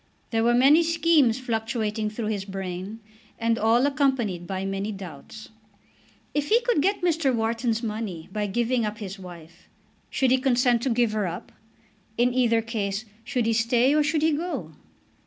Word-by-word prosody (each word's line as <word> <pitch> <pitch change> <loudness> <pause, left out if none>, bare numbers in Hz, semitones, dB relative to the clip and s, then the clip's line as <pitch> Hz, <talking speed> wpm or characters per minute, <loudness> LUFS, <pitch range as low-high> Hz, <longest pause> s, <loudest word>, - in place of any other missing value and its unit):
There 225 -1 +1
were 240 +1 +3
many 275 +6 +6
schemes 325 -7 +3
fluctuating 225 -3 -2
through 215 0 -4
his 205 -3 -2
brain, 195 +2 -6 0.4
and 230 0 0
all 230 +4 +3
accompanied 265 - 0
by 190 0 -3
many 195 +2 -3
doubts. 195 +2 -10 0.8
If 295 0 -1
he 455 - +5
could 475 -10 +1
get 390 +3 0
Mr. 325 -5 +2
Wharton's 230 0 -1
money 210 -7 -4
by 210 -1 -1
giving 240 +4 0
up 210 0 -3
his 195 -2 -7
wife, 170 -2 -13 0.4
should 265 -2 +1
he 260 - +4
consent 245 -2 +2
to 265 - 0
give 235 -1 +2
her 210 -3 -1
up? 175 +1 -7 0.7
In 245 +1 +2
either 230 -3 +2
case 215 -2 -3 0.2
should 250 -1 -1
he 225 - +2
stay 235 +4 +3
or 305 - +4
should 305 +1 0
he 320 - +4
go? 290 - -3
230 Hz, 170 wpm, -25 LUFS, 210-260 Hz, 0.8 s, many